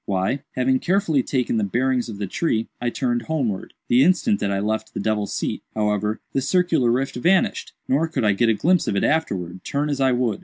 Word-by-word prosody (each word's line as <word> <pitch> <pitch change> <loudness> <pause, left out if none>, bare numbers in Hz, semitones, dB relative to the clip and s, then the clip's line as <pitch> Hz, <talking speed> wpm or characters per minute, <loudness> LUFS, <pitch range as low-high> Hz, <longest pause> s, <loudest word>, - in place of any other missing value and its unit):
"Why, 100 +8 0
having 130 +1 +2
carefully 175 -6 +1
taken 125 -2 -1
the 110 - +1
bearings 125 +4 0
of 105 - -6
the 100 - -3
tree, 115 - -1
I 120 - 0
turned 120 -1 -1
homewards. 120 -8 -3
The 125 +2 +5
instant 205 - +2
that - - -1
I 100 - 0
left 110 +2 -2
'the - - -2
devil's 105 0 -1
seat,' - - -2
however, 105 0 0
the 135 - +1
circular 165 -4 +2
rift 130 +2 0
vanished; 180 +9 +1
nor 150 +5 +2
could 160 - -2
I 105 - +4
get 115 +4 +2
a 110 - +3
glimpse 175 - +2
of - - 0
it 100 - +1
afterwards, 95 - -1
turn 145 +1 -1
as 140 -1 -2
I 130 -1 +4
would. 120 -4 0
125 Hz, 220 wpm, -22 LUFS, 105-145 Hz, -, The